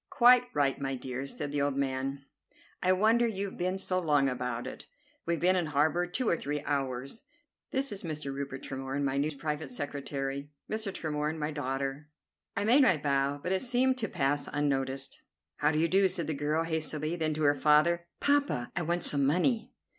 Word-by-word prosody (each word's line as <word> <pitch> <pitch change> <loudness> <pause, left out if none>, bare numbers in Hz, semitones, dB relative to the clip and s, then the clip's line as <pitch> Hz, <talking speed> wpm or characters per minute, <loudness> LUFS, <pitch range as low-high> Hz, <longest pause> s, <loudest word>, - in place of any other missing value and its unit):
"Quite 245 0 +6
right, 140 -2 +1
my 135 -1 -1
dear," 130 +1 -5
said 145 +1 -4
the 145 -1 0
old 140 -1 0
man; 135 0 -2 0.6
"I 185 - +3
wonder 220 +5 +4
you've 200 -3 -3
been 185 +2 0
so 185 -1 0
long 145 -5 +3
about 125 -2 -2
it. 130 - -8 0.4
We've 170 0 +1
been 185 +2 +4
in 175 -3 +1
harbor 155 +4 +2
two 235 +7 -2
or - - +4
three 145 -1 -3
hours. 135 - -2 0.5
This 275 +1 -1
is 200 - -5
Mr. 150 -4 -4
Rupert 135 -1 -5
Tremorne, 135 +1 -3
my 135 0 0
new 145 +1 -1
private 150 0 -3
secretary. 140 +1 -4 0.2
Mr. 215 -2 -2
Tremorne, 155 -2 -2
my 150 0 -2
daughter." 140 0 -3 0.5
I 200 - +1
made 245 +7 +5
my 210 - +5
bow, 140 -1 +1
but 180 - -2
it 190 - +2
seemed 255 +1 +2
to 220 - -1
pass 145 -3 0
unnoticed. 135 -2 -1 0.4
"How 150 +1 +3
do 155 - -1
you 165 +2 +3
do," 190 +2 +4
said 170 -2 -3
the 155 - -1
girl 150 +3 0
hastily; 160 0 -2
then, 155 -3 -1
to 155 - -2
her 145 0 +5
father, 155 +4 +3
"Poppa, 285 - +1
I 175 - 0
want 170 +1 0
some 140 -1 +4
money!" 185 - +1
150 Hz, 190 wpm, -30 LUFS, 140-180 Hz, 0.6 s, Quite